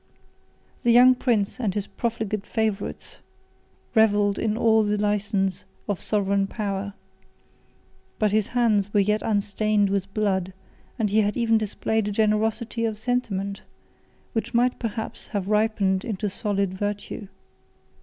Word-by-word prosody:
The 240 - +1
young 250 +2 +8
prince 235 -3 0
and 210 -6 -1
his 205 -2 -1
profligate 220 -4 -3
favorites 220 -3 -3 0.7
revelled 205 -2 +3
in 220 -1 0
all 225 -1 +4
the 210 0 0
license 205 -2 0 0.2
of 205 -3 -2
sovereign 200 -1 +1
power; 200 -1 -4 1.2
but 215 -2 +2
his 215 -1 +2
hands 215 -5 +1
were - - +6
yet 210 +2 +2
unstained 205 -1 +1
with 195 0 -1
blood; 190 -3 0 0.4
and 215 -4 0
he 215 +1 +4
had 205 0 0
even 225 -2 +3
displayed 215 0 -1
a - - -1
generosity 220 +2 0
of 220 -2 -1
sentiment, 210 -4 -2 0.7
which 230 +1 -2
might 245 +1 +2
perhaps 225 -1 -5
have 200 -2 -3
ripened 210 -3 +1
into 210 -3 -3
solid 200 -3 -1
virtue. 205 +1 -4
210 Hz, 135 wpm, -24 LUFS, 200-225 Hz, 1.2 s, young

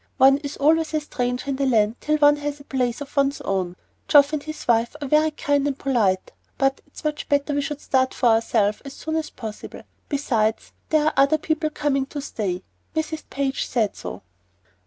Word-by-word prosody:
One 270 0 +6
is 285 -1 -6
always 315 +2 +2
a - - +3
stranger 250 -3 -3
in 265 - -2
the 275 0 +1
land 220 -3 +3
till 305 0 +1
one 290 0 +5
has 290 0 -4
a - - -12
place 250 -2 -1
of 285 - -8
one's 280 0 +2
own. 185 -2 -2 0.3
Geoff 290 0 +6
and 305 - 0
his 310 +1 -8
wife 235 +2 +2
are 285 - -4
very 305 +3 +4
kind 285 -2 0
and 280 -2 -2
polite, 215 -10 +1 0.3
but 270 0 +1
it's 290 - -13
much 300 -1 -3
better 285 +1 +1
we 285 - +1
should 295 0 -4
start 260 -1 +1
for 245 - +3
ourselves 225 -2 +2
as 275 -1 -8
soon 315 +2 -4
as 320 -1 -1
possible. 220 -3 -8 0.3
Besides, 230 -7 0 0.2
there 310 -1 +3
are 310 - +2
other 275 +3 +4
people 310 0 -1
coming 275 -3 0
to 290 - -6
stay; 195 -9 -3 0.3
Mrs. 315 0 -2
Page 275 -1 -1
said 220 -5 0
so." - - -7
280 Hz, 200 wpm, -23 LUFS, 245-295 Hz, 0.3 s, One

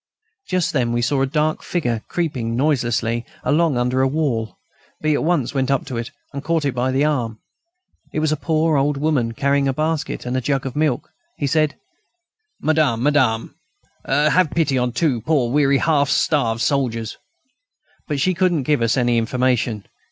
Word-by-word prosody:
Just 180 -1 0
then, 120 -5 +1
we 120 0 0
saw 135 +2 +1
a 135 - +2
dark 155 +2 0
figure 120 -11 -2
creeping 130 -10 -2
noiselessly 120 -4 0 0.2
along 155 -2 +2
under 125 +1 0
the 135 - +3
wall. 130 -7 -1 0.4
B. 155 0 +1
at - - 0
once 155 -6 0
went 135 -1 0
up 135 -1 +1
to 130 -4 -5
it, 115 0 -4 0.2
and 140 0 -5
caught 165 -1 0
it 140 - 0
by 125 +1 0
the 135 +3 +2
arm. 120 -7 -1 0.7
It - - -5
was 155 0 +1
a - - +2
poor 160 0 +1
old 140 +1 +1
woman, 140 -6 0
carrying 140 +1 +1
a 135 - +1
basket 155 -2 -2
and 125 +1 -2
a 130 - 0
jug 135 +1 -1
of 130 - -5
milk. 150 -4 0 0.3
Said 155 +1 +2
he: - - -35 0.9
"Madame, 150 -7 +2
madame, 130 -6 +2 0.5
have 150 +4 +3
pity 155 -4 +1
on 125 -1 +1
two 130 -3 0
poor 125 -2 +1
weary, 140 0 +3
half 145 -2 +2
starved 115 -7 +1
soldiers...." 120 -6 -1 0.9
But 145 -3 -2
she 185 +7 +2
couldn't 175 -4 +1
give 145 -1 +1
us 115 +1 +2
any 120 -2 +2
information. 120 -2 0
140 Hz, 180 wpm, -21 LUFS, 120-155 Hz, 0.9 s, the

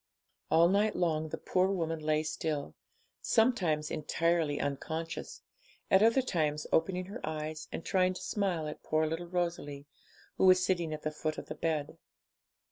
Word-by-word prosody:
All 165 +1 +6
night 205 +3 +2
long 160 -3 0
the - - -4
poor 185 0 +1
woman 165 -4 -1
lay 155 0 +1
still, 155 -1 -3 0.5
sometimes 180 -11 +2
entirely 160 -1 0
unconscious, 160 +4 -4 0.5
at 190 - +6
other 230 +4 +5
times 155 -9 0
opening 180 +2 +2
her 200 - -8
eyes 155 0 -4
and - - -5
trying 185 -1 +2
to - - -7
smile 185 -6 -1
at 150 - -7
poor 155 0 +1
little 165 +2 -3
Rosalie, 170 -5 -3 0.5
who - - +3
was 185 0 +6
sitting 175 -4 0
at 155 0 -5
the 155 - -1
foot 155 0 -3
of - - -6
the - - -3
bed. 160 0 -2
165 Hz, 160 wpm, -31 LUFS, 155-185 Hz, 0.5 s, All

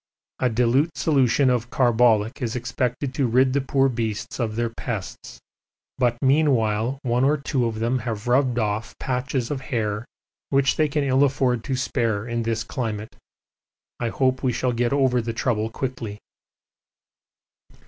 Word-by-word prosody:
A 125 - +2
dilute 125 +7 +1
solution 135 -3 +3
of 120 -1 -1
carbolic 120 -1 +2
is 120 -1 -2
expected 125 +2 -2
to 130 -1 +1
rid 130 +2 +3
the 140 - +2
poor 135 0 +2
beasts 115 -4 -3
of 110 -3 -1
their 115 0 -1
pests, 110 -6 -6 0.6
but 120 -2 +2
meanwhile 130 -4 +2
one 125 0 +1
or 145 +3 +3
two 135 -3 -1
of 110 -1 -4
them 120 +3 0
have 115 -2 -5
rubbed 125 0 +2
off 110 0 -2
patches 130 -1 -2
of 140 -2 -3
hair 110 -4 -2 0.4
which 140 0 +2
they 155 - +2
can 145 0 -1
ill 135 0 +3
afford 130 -4 +1
to 135 - -1
spare 115 -4 -1
in 120 0 -2
this 115 0 -1
climate. 110 -5 -4 0.8
I 120 - -1
hope 130 +2 +1
we 130 - +1
shall 125 +1 -1
get 120 0 0
over 130 -3 +2
the 115 0 -4
trouble 110 -2 0
quickly. 115 -4 -5
125 Hz, 160 wpm, -23 LUFS, 115-130 Hz, 0.8 s, solution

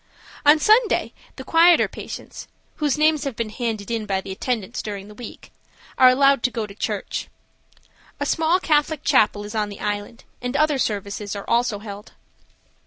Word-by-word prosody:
On 295 +2 +8
Sunday 435 +8 +3 0.2
the - - -8
quieter 335 +1 +5
patients, - - -9 0.3
whose 300 -2 0
names 305 -1 +3
have 275 -5 -4
been 225 -2 -3
handed 225 -3 -4
in 225 -2 -2
by 195 -1 0
the 190 - -8
attendants 230 +2 -3
during 200 -2 -6
the - - -11
week, 230 +2 -11 0.4
are 255 -1 +7
allowed 275 +1 +4
to 255 - +2
go 230 -3 -3
to 205 - -11
church. 205 - -4 0.9
A - - -1
small 325 +3 +2
Catholic 305 -3 +1
chapel 205 -1 +3
is 205 - -8
on 210 -2 -1
the 200 - -9
island, 205 +3 -4 0.2
and 250 +3 -2
other 300 -2 +2
services 205 -2 -3
are 200 - -7
also 235 -2 +1
held. 205 0 -10
235 Hz, 175 wpm, -22 LUFS, 205-295 Hz, 0.9 s, On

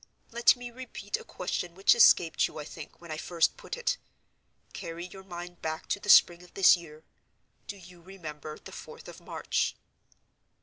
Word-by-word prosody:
Let 235 +2 +5
me 245 -1 -8
repeat 235 -5 -5
a - - -11
question 180 -1 -4
which 195 +1 +5
escaped 175 -8 +5
you, - - -12
I 150 - -6
think, 155 0 -10
when 170 -2 -11
I 155 - -3
first 165 +1 +1
put - - -7
it. 485 - 0 0.8
Carry 170 +1 -6
your 190 +1 -11
mind 175 -1 -9
back 160 0 -4
to - - 0
the 205 - -8
spring 175 -3 +7
of 180 - -18
this 195 - +7
year. 160 -3 -12 0.6
Do 200 - -6
you 175 -2 -15
remember 155 -5 -9
the - - -12
fourth - - -11
of - - -11
March?" - - -2
175 Hz, 180 wpm, -29 LUFS, 165-195 Hz, 0.8 s, spring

